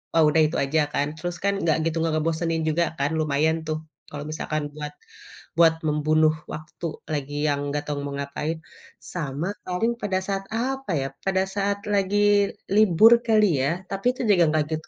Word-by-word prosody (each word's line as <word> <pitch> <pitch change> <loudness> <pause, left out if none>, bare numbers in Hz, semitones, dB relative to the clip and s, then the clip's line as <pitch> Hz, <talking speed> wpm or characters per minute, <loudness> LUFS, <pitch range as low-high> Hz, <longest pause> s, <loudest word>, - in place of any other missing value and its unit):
oh, 165 - +6
udah 160 +1 +3
itu 155 - -3
aja 145 +3 +1
kan, 145 - +1
terus 175 +2 -4
kan 200 0 +2
enggak 160 -2 +3
gitu 165 - -2
enggak 165 -1 0
ngebosenin 165 +1 -1
juga 165 +2 +2 0.2
kan, 140 +2 +1
lumayan 155 +1 +1
tuh 155 0 -1 0.3
kalau 145 0 -6
misalkan 155 -1 -3
buat 150 -1 -5 0.7
buat 165 -1 +6
membunuh 155 +1 +3 0.2
waktu 160 +2 -6 0.3
lagi 145 -1 -3
yang 145 -1 +1
enggak 145 +1 -2
tahu 145 -1 -2
mau 140 - -4
ngapain. 140 +3 -3 0.6
Sama 150 -1 -3 0.2
paling 185 +6 0
pada 195 -2 0
saat 195 -1 -2
apa 265 0 -2
ya? 135 - -2 0.2
Pada 190 -1 +2
saat 200 0 0
lagi 205 +1 +3 0.3
libur 215 +1 +6 0.2
kali 210 -9 +4
ya, 135 - +2 0.2
tapi 195 +2 -4
itu - - -4
juga 185 -4 +5
enggak 155 0 +2
gitu 155 0 -4
160 Hz, 180 wpm, -24 LUFS, 150-195 Hz, 0.7 s, oh